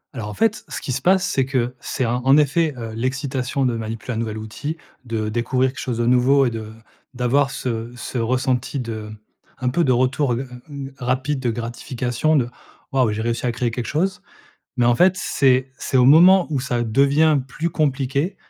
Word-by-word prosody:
Alors 105 Hz, -3 st, -5 dB
en 105 Hz, -, -7 dB
fait, 225 Hz, -1 st, +1 dB
ce -, -, -5 dB
qui -, -, -5 dB
se 130 Hz, +2 st, -2 dB
passe, 185 Hz, +3 st, +3 dB
c'est 135 Hz, -, +1 dB
que, 125 Hz, -2 st, -1 dB
c'est 130 Hz, -, -2 dB
en 120 Hz, +2 st, -1 dB
en 135 Hz, +3 st, +5 dB
effet, 150 Hz, +1 st, +2 dB
heu, 115 Hz, -1 st, -6 dB
l'excitation 130 Hz, +2 st, -2 dB
de 120 Hz, -, +1 dB
manipuler 115 Hz, +2 st, -5 dB
un -, -, -4 dB
nouvel 110 Hz, -1 st, -3 dB
outil, 145 Hz, +9 st, -5 dB, 0.3 s
de 110 Hz, -2 st, -2 dB
découvrir 125 Hz, +3 st, 0 dB
quelque -, -, -10 dB
chose 125 Hz, -3 st, -3 dB
de 120 Hz, -, 0 dB
nouveau 125 Hz, +3 st, +4 dB
et 120 Hz, -, 0 dB
de 110 Hz, -1 st, -6 dB, 0.4 s
d'avoir 135 Hz, +3 st, +2 dB
ce 115 Hz, -3 st, -4 dB
ce 125 Hz, -, -6 dB
ressenti 130 Hz, +3 st, 0 dB
de 110 Hz, -3 st, -5 dB, 0.5 s
un 125 Hz, 0 st, -1 dB
peu 165 Hz, +7 st, +1 dB
de 130 Hz, -, +2 dB
retour, 130 Hz, +1 st, +2 dB
heu 120 Hz, -, -2 dB
heu, 135 Hz, -, -7 dB, 0.2 s
hem, 140 Hz, -2 st, -7 dB
rapide 130 Hz, +3 st, -1 dB
de 125 Hz, -2 st, -1 dB
gratification 120 Hz, +5 st, -2 dB
de 130 Hz, -5 st, +2 dB, 0.4 s
«Waouh! 130 Hz, -5 st, +2 dB
j'ai 110 Hz, +1 st, -3 dB
réussi 115 Hz, +1 st, -2 dB
à -, -, +1 dB
créer 120 Hz, 0 st, -1 dB
quelque 120 Hz, 0 st, -4 dB
chose». 180 Hz, +4 st, -1 dB, 0.6 s
Mais 120 Hz, -, +3 dB
en 120 Hz, 0 st, +4 dB
fait, 180 Hz, +7 st, +5 dB
c'est 130 Hz, -4 st, +2 dB
c'est 130 Hz, -, -1 dB
au 125 Hz, -, +5 dB
moment 175 Hz, +6 st, +7 dB
où 140 Hz, -4 st, -1 dB
ça 120 Hz, -2 st, -1 dB
devient 140 Hz, +6 st, +3 dB
plus 160 Hz, +6 st, -3 dB
compliqué, 140 Hz, +3 st, 0 dB
130 Hz, 205 wpm, -21 LUFS, 120-140 Hz, 0.6 s, moment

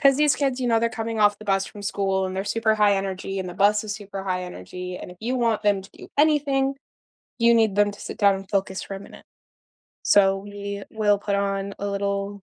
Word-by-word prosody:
'Cause 275 Hz, -2 st, +5 dB
these 300 Hz, -1 st, +3 dB
kids, 270 Hz, -3 st, 0 dB
you 250 Hz, -, 0 dB
know, 230 Hz, -1 st, +4 dB
they're 230 Hz, +1 st, +1 dB
coming 225 Hz, 0 st, -4 dB
off 205 Hz, -1 st, +4 dB
the 215 Hz, -, -11 dB
bus 195 Hz, -2 st, +1 dB
from 205 Hz, -, -10 dB
school 195 Hz, -2 st, 0 dB
and 185 Hz, 0 st, -5 dB
they're 190 Hz, -, -1 dB
super 220 Hz, +1 st, +1 dB
high 210 Hz, -1 st, +4 dB
energy, 195 Hz, 0 st, -3 dB
and 185 Hz, -, -4 dB
the 175 Hz, -, -7 dB
bus 210 Hz, +3 st, +3 dB
is 205 Hz, -1 st, -3 dB
super 200 Hz, -2 st, -7 dB
high 185 Hz, -1 st, -1 dB
energy, 180 Hz, -, -7 dB
and -, -, -8 dB
if 180 Hz, -, -12 dB
you 240 Hz, +4 st, -1 dB
want 230 Hz, -3 st, +1 dB
them 205 Hz, -2 st, +2 dB
to 195 Hz, -, -15 dB
do -, -, -12 dB
anything, 280 Hz, -3 st, +3 dB, 0.7 s
you 235 Hz, 0 st, +5 dB
need 220 Hz, -4 st, +3 dB
them 205 Hz, 0 st, +3 dB
to 200 Hz, -, -13 dB
sit -, -, -7 dB
down 200 Hz, -2 st, +4 dB
and 195 Hz, 0 st, -9 dB
focus 190 Hz, -2 st, -1 dB
for 195 Hz, -, -6 dB
a -, -, -7 dB
minute. -, -, -13 dB, 0.8 s
So, 195 Hz, -1 st, +5 dB
we 200 Hz, 0 st, -6 dB
will 210 Hz, -2 st, +2 dB
put 200 Hz, -1 st, -1 dB
on 200 Hz, 0 st, -1 dB
a 205 Hz, -, -2 dB
little 200 Hz, 0 st, -2 dB
200 Hz, 240 wpm, -24 LUFS, 195-220 Hz, 0.8 s, Cause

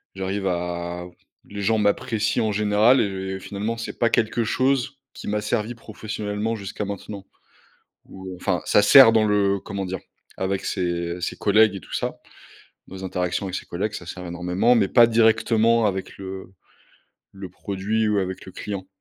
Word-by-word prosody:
J'arrive 95 Hz, +1 st, -2 dB
à 85 Hz, 0 st, -3 dB, 0.4 s
les 100 Hz, 0 st, -6 dB
gens 110 Hz, +3 st, +2 dB
m'apprécient 110 Hz, +1 st, +1 dB
en -, -, 0 dB
général 105 Hz, +4 st, +4 dB
et 95 Hz, -1 st, -3 dB
finalement 105 Hz, +4 st, -4 dB
c'est 115 Hz, -, -6 dB
pas 115 Hz, -, +3 dB
quelque 115 Hz, 0 st, +1 dB
chose 130 Hz, +3 st, 0 dB, 0.2 s
qui -, -, -9 dB
m'a 105 Hz, 0 st, -1 dB
servi 110 Hz, +2 st, -2 dB
professionnellement 110 Hz, 0 st, -4 dB
jusqu'à 100 Hz, 0 st, -5 dB
maintenant. 100 Hz, 0 st, -7 dB, 0.8 s
Ou, 95 Hz, -1 st, -9 dB
enfin, 90 Hz, -1 st, -1 dB
ça 105 Hz, -, +4 dB
sert 120 Hz, +3 st, +9 dB
dans 110 Hz, -1 st, +3 dB
le 100 Hz, -2 st, +2 dB
comment 100 Hz, +1 st, -5 dB
dire? 95 Hz, +1 st, -4 dB, 0.4 s
Avec 95 Hz, +1 st, -2 dB
ses 85 Hz, -2 st, -2 dB
ses -, -, -2 dB
collègues 105 Hz, 0 st, +4 dB
et -, -, -5 dB
tout -, -, -13 dB
ça. -, -, -3 dB, 0.7 s
Dans 95 Hz, -, -10 dB
les 95 Hz, -, -8 dB
interactions 90 Hz, +1 st, -2 dB
avec 95 Hz, -1 st, -4 dB
ses -, -, -5 dB
collègues, 100 Hz, +5 st, -3 dB
ça 85 Hz, -, -7 dB
sert 90 Hz, +1 st, -7 dB
énormément 90 Hz, +7 st, +1 dB
mais 100 Hz, -5 st, +3 dB
pas 120 Hz, -1 st, +6 dB
directement 115 Hz, 0 st, +3 dB
avec 95 Hz, -2 st, -3 dB
le 95 Hz, -1 st, -8 dB, 0.8 s
le 95 Hz, -1 st, -8 dB
produit 100 Hz, +4 st, -2 dB
ou 105 Hz, -1 st, +2 dB
avec 95 Hz, -1 st, -3 dB
le 95 Hz, -, -11 dB
client. 100 Hz, -1 st, -6 dB
100 Hz, 170 wpm, -23 LUFS, 95-110 Hz, 0.8 s, sert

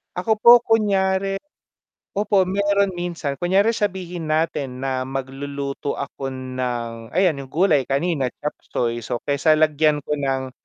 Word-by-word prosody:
Ako 215 Hz, +4 st, 0 dB
po 240 Hz, +1 st, +8 dB
kunyari 195 Hz, -3 st, +1 dB, 0.8 s
opo 200 Hz, -1 st, +2 dB
meron 200 Hz, +1 st, +1 dB
minsan. 170 Hz, -6 st, -4 dB
Kunyari 195 Hz, +5 st, +3 dB
sabihin 180 Hz, -6 st, -3 dB
natin 145 Hz, -5 st, -1 dB
na 130 Hz, -1 st, -2 dB
magluluto 140 Hz, +1 st, -4 dB
ako 140 Hz, -1 st, -5 dB
ng 125 Hz, -3 st, -4 dB
ayan 180 Hz, -7 st, +3 dB
'yung 135 Hz, -, -7 dB
gulay 155 Hz, -4 st, +2 dB
kanina 140 Hz, -1 st, 0 dB
chopseuy, 120 Hz, -5 st, -3 dB
so, 120 Hz, +2 st, -4 dB
kaysa 145 Hz, +2 st, +3 dB
lagyan 155 Hz, -1 st, +2 dB
ko -, -, -7 dB
ng 135 Hz, -1 st, -2 dB
150 Hz, 130 wpm, -22 LUFS, 135-190 Hz, 0.8 s, po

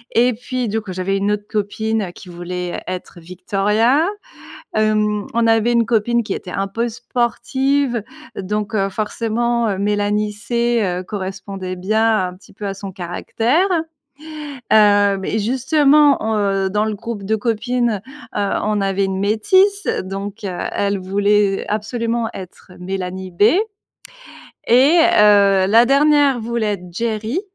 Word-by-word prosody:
et 245 Hz, +2 st, +4 dB
puis, 245 Hz, +1 st, -4 dB
du 220 Hz, +2 st, -1 dB
coup, 190 Hz, -3 st, -7 dB
j'avais 190 Hz, +2 st, -1 dB
une 200 Hz, +1 st, 0 dB
autre 205 Hz, 0 st, -2 dB
copine 215 Hz, -1 st, -2 dB
qui 180 Hz, -, -13 dB
voulait 175 Hz, 0 st, -5 dB
être 180 Hz, -1 st, -6 dB
Victoria, 210 Hz, -, +1 dB, 0.7 s
hem, 215 Hz, -1 st, +1 dB
on 230 Hz, 0 st, +2 dB
avait 225 Hz, +1 st, +3 dB
une 235 Hz, -1 st, +3 dB
copine 235 Hz, +1 st, +1 dB
qui 200 Hz, -, -3 dB
était 180 Hz, -, -7 dB
un 195 Hz, 0 st, -2 dB
peu 230 Hz, +4 st, -2 dB
sportive 245 Hz, +2 st, -1 dB, 0.4 s
donc, 210 Hz, +3 st, -3 dB
heu, 195 Hz, -2 st, +1 dB
forcément, 230 Hz, +3 st, -1 dB
heu, 195 Hz, -, -2 dB
Mélanie 205 Hz, +1 st, 0 dB
C, 235 Hz, +2 st, 0 dB
heu, 180 Hz, -1 st, -2 dB
correspondait 190 Hz, -1 st, -6 dB
bien 215 Hz, +1 st, +1 dB
un 180 Hz, -, -8 dB
petit 195 Hz, -, -19 dB
peu 205 Hz, +1 st, -8 dB
à 195 Hz, -, -3 dB
son 195 Hz, 0 st, -8 dB
caractère. 225 Hz, -, 0 dB, 1.0 s
Hem 205 Hz, -2 st, +4 dB
et 220 Hz, -, -1 dB
justement, 280 Hz, +5 st, +3 dB, 0.2 s
heu, 195 Hz, -2 st, 0 dB
dans 210 Hz, +2 st, 0 dB
le 220 Hz, -, -2 dB
groupe 230 Hz, -1 st, -6 dB
de 220 Hz, +3 st, 0 dB
copines, 230 Hz, -1 st, -1 dB, 0.4 s
heu, 200 Hz, -1 st, 0 dB
on 210 Hz, -1 st, 0 dB
avait 195 Hz, 0 st, 0 dB
une 190 Hz, 0 st, -3 dB
métisse 375 Hz, -, +2 dB, 0.2 s
donc, 195 Hz, +3 st, -6 dB
heu, 180 Hz, -2 st, -4 dB, 0.2 s
elle 200 Hz, 0 st, 0 dB
voulait 200 Hz, +1 st, +1 dB
absolument 230 Hz, +2 st, -2 dB
être 185 Hz, 0 st, -11 dB
Mélanie 185 Hz, 0 st, -5 dB
B 175 Hz, +3 st, +1 dB, 1.2 s
et 270 Hz, +8 st, +5 dB, 0.2 s
heu, 200 Hz, -2 st, +5 dB
la 230 Hz, +4 st, +6 dB
dernière 285 Hz, -1 st, +4 dB
voulait 225 Hz, -2 st, -1 dB
être 180 Hz, -2 st, -11 dB
Geri, 225 Hz, -, -2 dB
210 Hz, 145 wpm, -19 LUFS, 195-235 Hz, 1.2 s, la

